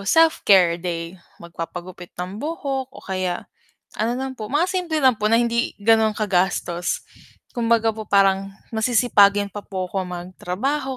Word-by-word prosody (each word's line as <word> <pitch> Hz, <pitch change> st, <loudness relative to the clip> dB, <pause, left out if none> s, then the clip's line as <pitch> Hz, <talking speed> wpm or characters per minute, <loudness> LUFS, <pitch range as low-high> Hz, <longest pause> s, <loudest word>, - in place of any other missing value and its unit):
self-care 195 Hz, -, +5 dB
day, 170 Hz, 0 st, -4 dB, 0.3 s
magpapagupit 175 Hz, +1 st, -8 dB
ng 185 Hz, +3 st, -5 dB
buhok 280 Hz, -4 st, -3 dB
o -, -, -12 dB
kaya 185 Hz, -2 st, -3 dB, 0.5 s
ano 230 Hz, +3 st, 0 dB
lang 265 Hz, 0 st, -4 dB
po, 215 Hz, -1 st, -5 dB
mga 295 Hz, +6 st, +2 dB
simple 355 Hz, -4 st, -1 dB
lang 260 Hz, -3 st, +5 dB
po, 210 Hz, 0 st, +1 dB
na 230 Hz, -, +5 dB
hindi 235 Hz, 0 st, 0 dB
gano'n 220 Hz, +1 st, +4 dB
kagastos. 180 Hz, -3 st, 0 dB, 0.5 s
Kumbaga 230 Hz, -2 st, +2 dB
po 220 Hz, -, -6 dB
parang 195 Hz, 0 st, +3 dB, 0.2 s
masisipagin 220 Hz, -3 st, +4 dB
pa 205 Hz, 0 st, -6 dB
po 185 Hz, -1 st, -4 dB
ako 190 Hz, +1 st, -2 dB
mag-trabaho, 185 Hz, +10 st, -3 dB
210 Hz, 140 wpm, -22 LUFS, 185-245 Hz, 0.5 s, self-care